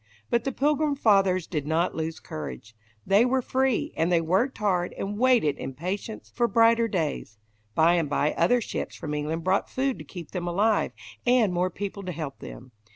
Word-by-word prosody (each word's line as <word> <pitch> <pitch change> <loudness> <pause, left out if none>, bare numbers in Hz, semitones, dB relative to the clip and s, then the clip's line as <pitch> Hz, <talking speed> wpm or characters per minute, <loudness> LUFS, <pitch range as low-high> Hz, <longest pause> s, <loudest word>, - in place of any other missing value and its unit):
But 235 -1 +1
the 270 - 0
Pilgrim 295 +2 +1
Fathers 195 - +3
did 150 -4 -4
not 165 +3 +1
lose 160 0 -4
courage. 75 - -8 0.3
They 200 +3 +5
were 255 +1 +1
free, 260 -1 0
and 165 +2 +1
they 170 - +4
worked 190 +11 +1
hard, 185 -5 0
and 205 +2 -4
waited 245 - +3
in 135 0 -6
patience 190 - -5
for 240 -1 +2
brighter 230 0 +4
days. 155 - -3 0.4
By 165 +2 +5
and 160 -4 0
by 145 +1 +1
other 240 +9 +3
ships - - -4
from 150 - -5
England 155 +2 -2
brought 190 +3 +1
food 265 0 -1
to - - -7
keep 170 -5 -10
them 175 -1 -4
alive, 205 +5 +2 0.3
and 240 -6 +3
more 180 +1 +1
people 200 +2 -5
to 185 -2 -5
help 155 -4 -6
them. 125 +1 -10
185 Hz, 190 wpm, -26 LUFS, 160-230 Hz, 0.4 s, They